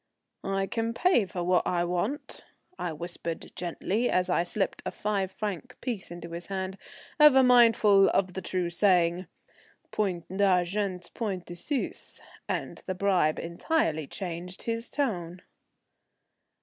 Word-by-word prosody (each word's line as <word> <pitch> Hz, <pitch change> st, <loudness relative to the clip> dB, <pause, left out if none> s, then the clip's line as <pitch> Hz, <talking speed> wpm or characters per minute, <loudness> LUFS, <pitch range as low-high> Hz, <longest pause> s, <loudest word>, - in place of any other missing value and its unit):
"I 195 Hz, 0 st, +1 dB
can 230 Hz, +2 st, -2 dB
pay 360 Hz, -, +3 dB
for 180 Hz, -2 st, -4 dB
what 180 Hz, 0 st, +2 dB
I 175 Hz, -1 st, +1 dB
want," 180 Hz, +11 st, -3 dB, 0.4 s
I 175 Hz, -, -2 dB
whispered 170 Hz, +1 st, -5 dB
gently, 190 Hz, +6 st, -1 dB
as 180 Hz, 0 st, +1 dB
I 175 Hz, -, +3 dB
slipped 190 Hz, +3 st, -1 dB
a -, -, -2 dB
five 200 Hz, -3 st, -2 dB
franc 210 Hz, +5 st, -5 dB
piece 235 Hz, -7 st, -4 dB
into 170 Hz, 0 st, -8 dB
his 170 Hz, +1 st, -4 dB
hand, 190 Hz, 0 st, -4 dB, 0.4 s
ever 285 Hz, -3 st, +8 dB
mindful 225 Hz, -5 st, +6 dB
of 185 Hz, -2 st, +1 dB
the 190 Hz, -, -4 dB
true 180 Hz, -1 st, -2 dB
saying, 175 Hz, -1 st, +3 dB, 0.6 s
Point 185 Hz, -5 st, -1 dB
d'argent, 190 Hz, -1 st, +1 dB
point 195 Hz, -6 st, -3 dB
de 175 Hz, -, -8 dB
Suisse; 260 Hz, -, -4 dB, 0.3 s
and -, -, -3 dB
the 185 Hz, -, -2 dB
bribe 185 Hz, -5 st, +2 dB
entirely 165 Hz, -, -1 dB
changed 180 Hz, +1 st, -6 dB
his 230 Hz, 0 st, -3 dB
tone. 180 Hz, -11 st, -2 dB
185 Hz, 135 wpm, -28 LUFS, 175-210 Hz, 0.6 s, ever